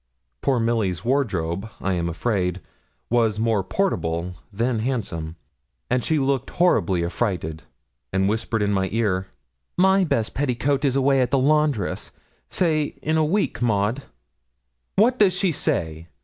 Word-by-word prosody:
Poor 130 -3 +2
Milly's 110 -6 0
wardrobe, 100 -8 0
I 95 - -1
am 85 -1 -1
afraid, 90 -1 -1 0.5
was 115 -3 +2
more 110 -3 +1
portable 90 - -1 0.2
than 115 +3 0
handsome; 100 -10 -3 0.6
and 125 -1 +2
she 160 - +1
looked 135 -2 0
horribly 95 - +2
affrighted, 85 -4 -2 0.5
and 95 +1 +1
whispered 110 +1 0
in 100 0 +1
my 95 -1 0
ear 100 -4 0 0.5
'My 190 +1 +5
best 115 -10 0
petticoat 135 +1 0
is 135 -2 +2
away 135 0 +3
at 125 - +1
the 135 - +2
laundress; 145 -6 +1 0.4
say 155 -4 0
in 155 +1 +1
a 160 - +3
week, 185 +1 0
Maud.' 110 +2 +1 0.9
'What 240 +5 +3
does 200 -3 +5
she 185 0 +1
say?' 80 - -2
115 Hz, 140 wpm, -23 LUFS, 95-140 Hz, 0.9 s, My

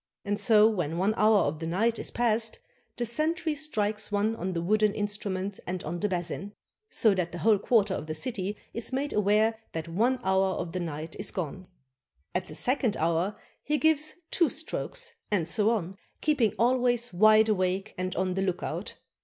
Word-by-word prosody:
And 205 +1 -1
so 215 0 +6
when 175 -7 -1
one 195 +4 +2
hour 215 -2 +4
of 150 -1 -1
the 165 - -4
night 220 +7 +1
is - - -3
past, 225 -1 +2 0.4
the 240 - 0
sentry 315 +7 0
strikes 215 -9 -1
one 210 +2 +1
on 185 -3 -3
the 170 - -2
wooden 215 +2 +2
instrument 205 -2 -2
and 180 0 -3
on 170 +3 -4
the 210 - 0
basin, 180 +3 -3 0.4
so 220 -3 +3
that 180 -3 -1
the 175 - -6
whole 215 +2 +3
quarter 210 -2 +2
of 155 - -4
the 155 - -3
city 200 +1 -2 0.2
is 230 +2 -3
made 275 +3 -2
aware 215 +2 +2
that 160 0 -4
one 230 +10 +1
hour 190 0 +2
of 170 -1 -4
the 185 - -3
night 160 -1 -5
is - - -2
gone. 185 +1 -5 0.7
At 180 +1 -2
the - - -9
second 250 -4 0
hour, 170 +5 0 0.3
he 300 +1 0
gives 310 0 +2 0.2
two 335 -5 +3
strokes, 475 - -3 0.2
and 185 -6 +1
so 205 +7 +2
on, 195 -4 -2 0.2
keeping 275 -8 +1
always 245 -1 +2
wide 215 +3 +6
awake 190 0 0
and 185 0 -3
on 185 0 0
the 190 - -1
lookout. 185 -2 -3
205 Hz, 185 wpm, -28 LUFS, 185-230 Hz, 0.7 s, so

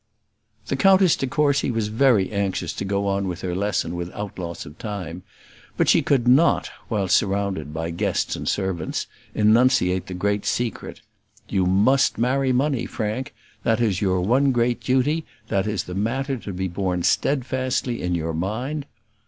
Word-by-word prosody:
The - - -1
Countess 190 -3 +5
de 135 - -2
Courcy 140 +1 +1
was 115 -3 -1
very 110 -4 +3
anxious 100 -4 -1
to - - -4
go 100 +1 -1
on 100 0 0
with 90 0 -4
her 90 -1 -3
lesson 95 -3 -1
without 90 +3 -6
loss 85 -1 -5
of 75 +3 -13
time; 90 -5 -5 0.6
but - - +2
she - - +5
could 130 -4 +1
not, 140 +7 +4 0.2
while 100 -4 -1
surrounded 95 -5 0
by 80 +2 -3
guests 85 - -1
and - - -3
servants, 95 -5 -2 0.3
enunciate 105 -4 +3
the 90 - -5
great 100 +2 0
secret: 120 -4 -3 0.5
"You 95 -3 +1
must 110 +9 +3
marry 130 +3 +1
money, 130 0 +1
Frank; 110 +4 -4 0.3
that 115 0 +1
is 105 -6 +1
your 95 -2 +1
one 130 +8 +3
great 120 -1 +1
duty; 140 +5 +1 0.3
that 100 0 0
is 105 -4 -1
the 90 - -8
matter 130 +8 -1
to 110 -4 -7
be 95 0 -2
borne 90 -1 -2
steadfastly 130 -1 0
in 90 0 -1
your 80 -1 -2
mind." 125 - -3
105 Hz, 165 wpm, -23 LUFS, 95-130 Hz, 0.6 s, Countess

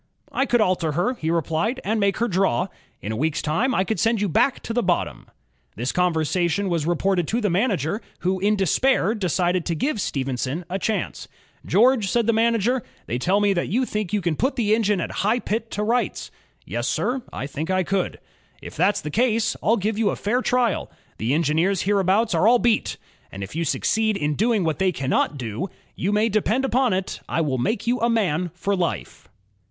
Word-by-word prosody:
" - - -34
''I 270 - 0
could 240 -2 +3
alter 180 -6 +1
her," 180 - +1
he 160 -10 -4
replied, 165 - 0
*'and 220 +2 0
make 200 -1 +1
her 235 - +1
draw. 190 - +1 0.3
In 105 - -3
a - - -2
week's 155 +6 -1
time 225 - +1
I 190 - +3
could 220 +3 -2
send 225 -1 +2
you 205 - +1
back 245 - +2
to 230 - -5
the 245 - +1
bottom." 175 -4 -1 0.5
This 125 +3 -2
conversation 180 +2 +1
was 165 -3 -1
reported 175 0 +1
to 230 - 0
the 210 -5 0
manager, 195 - 0 0.2
who 185 +2 0
in 205 +3 +2
despair 210 - +2
decided 180 -3 0
to 170 - 0
give 220 - -1
Stephenson 135 +4 -2
a 190 - -1
chance. 220 +2 -2 0.4
"George," 230 -2 +4
said 235 +2 +1
the 230 - +3
manager, 230 +2 +2 0.2
"they 120 - -3
tell 185 +9 +2
me 205 -1 +3
that 175 - -1
you 250 +6 +1
think 210 -6 -3
you 210 - 0
can 170 -3 0
put 260 - 0
the 215 -4 +2
engine 210 -3 +2
at - - -3
High 215 +5 +2
Pit 225 -1 -3
to 210 - -2
rights." 235 0 -1 0.3
"Yes, 120 +7 -3
sir, 245 +11 0
I - - -4
think 150 +4 -5
I 185 0 +2
could." 190 +1 -1 0.4
"If - - -10
that's 185 +6 +2
the 150 - -5
case, 230 +2 +1
I'll 225 +2 +3
give 210 +2 -1
you 215 -3 +3
a - - -1
fair 240 +5 0
trial.... 245 -4 +1 0.3
The 120 +6 +1
engineers 165 +5 +1
hereabouts 200 +2 +2
are 170 +5 +3
all 245 +2 +6
beat; 235 -2 +1 0.3
and 100 0 -6
if 100 - -8
you 165 - 0
succeed 220 +5 +1
in 150 -2 0
doing 220 +3 +1
what 160 +1 -1
they 190 -1 +3
cannot 140 -1 0
do, 125 - -4 0.3
you 190 - -1
may 210 +2 +3
depend 220 +4 +1
upon 260 -1 +2
it, 190 0 -2
I 165 - +1
will 135 -5 -1
make 175 - -1
you 245 +1 +1
a 235 - +2
man 180 -7 +1
for 200 +3 -1
life." 170 - -3
195 Hz, 210 wpm, -23 LUFS, 165-225 Hz, 0.5 s, all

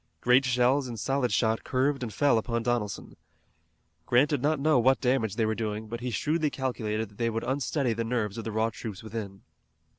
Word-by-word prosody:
Great 125 +2 +4
shells 125 +2 +2
and 115 -3 -6
solid 135 +1 0
shot 110 -1 +1
curved 135 +1 0
and 120 -3 -4
fell 140 +1 +3
upon 115 +1 -2
Donelson. 115 -5 -2 0.9
Grant 130 +5 +4
did 145 -4 0
not 150 +1 +1
know 150 -2 +3
what 130 +3 +4
damage 125 -5 +1
they 115 - +1
were 110 - +1
doing, 110 0 -3
but 115 +2 -5
he 125 +1 -3
shrewdly 155 +5 0
calculated 110 -6 -3
that 100 - -21
they 115 -1 +1
would 115 0 -3
unsteady 135 -1 0
the 115 +1 -2
nerves 115 -3 -2
of - - -5
the 110 - -4
raw 110 +1 0
troops 110 -3 -7
within. 105 -3 -6
120 Hz, 205 wpm, -28 LUFS, 110-130 Hz, 0.9 s, Great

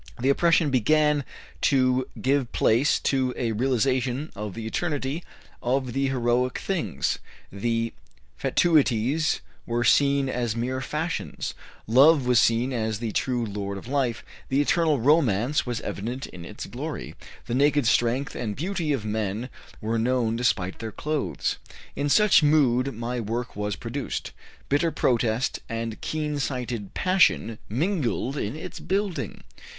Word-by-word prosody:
The 130 +3 +1
oppression 165 +1 +3
began 150 +4 +3 0.4
to 130 -2 +3
give 135 -2 +1
place 120 +7 +3
to 130 -2 +1
a 115 -2 0
realization 130 +3 0
of 105 -2 -5
the 115 - -5
eternity 145 +4 -2 0.4
of 125 0 0
the 135 +1 +1
heroic 125 -1 +1
things; 110 - -1 0.3
the 115 +3 -1 0.4
fatuities 150 -2 +2 0.3
were 120 +1 0
seen 140 +2 +4
as 120 -3 -1
mere 130 +2 -2
fashions; 155 +5 -3 0.3
love 135 +5 +6
was 125 -2 +4
seen 115 +4 +2
as 110 -3 -1
the 115 0 -3
true 125 +1 0
lord 100 -1 -4
of 100 - -9
life; 130 -4 -1 0.2
the 135 - +2
eternal 155 0 +2
romance 130 -2 +2
was 120 -2 -2
evident 120 +6 -4
in 85 -1 -10
its - - -7
glory; - - -6 0.3
the - - -4
naked 145 +1 +3
strength 120 +4 +2
and 105 -4 -3
beauty 170 -1 -2
of 130 -7 -1
men 110 +2 -2 0.3
were 115 +1 -1
known 115 -1 +1
despite 95 -6 0
their 115 -1 -5
clothes. 150 +6 -2 0.4
In 145 +1 -1
such 210 +5 +6
mood 140 -4 +3
my 120 +2 -3
work 115 +3 -3
was 105 0 -2
produced; - - -4 0.4
bitter 145 +4 +2
protest 120 -4 +1
and 115 -1 -4
keen 150 -2 -2
sighted 125 -7 -3
passion 185 - +2
mingled 140 - -1
in 115 -3 -3
its 160 +3 -7
building. 195 -1 -2
125 Hz, 140 wpm, -25 LUFS, 115-145 Hz, 0.4 s, love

